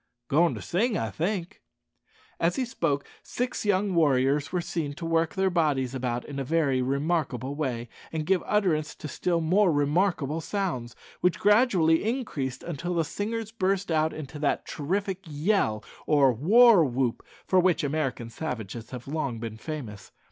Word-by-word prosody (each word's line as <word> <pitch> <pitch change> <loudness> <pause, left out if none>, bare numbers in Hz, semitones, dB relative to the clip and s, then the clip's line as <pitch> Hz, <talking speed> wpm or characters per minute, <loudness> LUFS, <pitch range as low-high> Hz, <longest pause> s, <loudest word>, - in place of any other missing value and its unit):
"Goin' 165 +4 +3
to - - -7
sing, 220 +6 0
I 110 -2 -2
think," 175 - -3
replied - - -52 0.3
Joe. - - +1
As 175 - 0
he 260 - 0
spoke 160 - -1 0.2
six 250 -2 -3
young 200 -1 +2
warriors 145 -2 +2
were 180 - 0
seen 165 -4 -3
to 165 - -7
work 165 0 +1
their 190 -1 +2
bodies 145 -7 +1
about 125 -2 -2
in 140 -1 -6
a - - -1
very 140 -3 +1
remarkable 140 -1 -1
way, 130 -5 -3 0.2
and 155 -1 -3
give 185 0 +2
utterance 170 -7 +1
to - - -7
still 170 +4 -1
more 180 +4 +3
remarkable 155 +1 +1
sounds, 165 - -3 0.2
which 180 -2 +2
gradually 205 -7 +4
increased 210 - -3
until 175 +2 -4
the 165 - +2
singers 220 +6 -4
burst 195 -4 0
out 155 0 +2
into 150 -1 -8
that 145 -1 0
terrific 190 +5 -2
yell, 150 - 0 0.2
or 140 -4 +5
war 205 - +6
whoop, 125 -3 -1 0.2
for 185 - +3
which 180 -3 +2
American 135 -5 -2
savages 115 -5 -5
have 125 -1 -8
long 140 -5 -2
been 110 -1 -5
famous. 110 - -7
160 Hz, 165 wpm, -27 LUFS, 135-185 Hz, 0.3 s, war